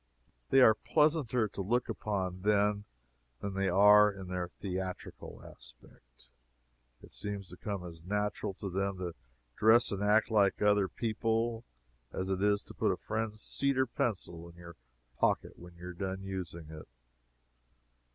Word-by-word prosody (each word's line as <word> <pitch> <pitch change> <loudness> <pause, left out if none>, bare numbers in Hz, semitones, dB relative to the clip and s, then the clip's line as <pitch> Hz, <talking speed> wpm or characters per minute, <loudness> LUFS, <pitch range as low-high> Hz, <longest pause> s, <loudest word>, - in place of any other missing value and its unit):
They 135 - +6
are 110 -3 +8
pleasanter 145 -4 +1
to 100 - -5
look 120 +6 0
upon 95 -3 -3
then 105 0 +2 0.5
than 100 - -4
they 95 0 0
are 105 +3 +7
in 95 -2 -9
their 90 -1 -2
theatrical 95 +1 -6
aspect. - - -15 0.8
It - - -14
seems 100 -2 -4
to - - -8
come 100 -4 -5
as 85 -2 -9
natural 105 +1 -2
to 100 0 -5
them 100 +1 -1
to 90 -2 -4 0.4
dress 115 +2 +5
and 100 -1 -3
act 105 +2 +3
like 100 -3 +3
other 105 -1 +3
people 115 +2 -1 0.5
as 95 +1 -3
it 95 0 -1
is 100 0 +2
to - - -12
put - - +1
a - - -2
friend's 110 -1 -3
cedar 135 -1 +2
pencil 90 -8 -3
in 85 - -16
your 85 -1 -12 0.4
pocket - - 0
when 85 0 -13
you 90 +1 -9
are - - -7
done 95 +1 -4
using 85 -4 -6
it. 80 -1 -10
100 Hz, 155 wpm, -32 LUFS, 90-110 Hz, 0.8 s, are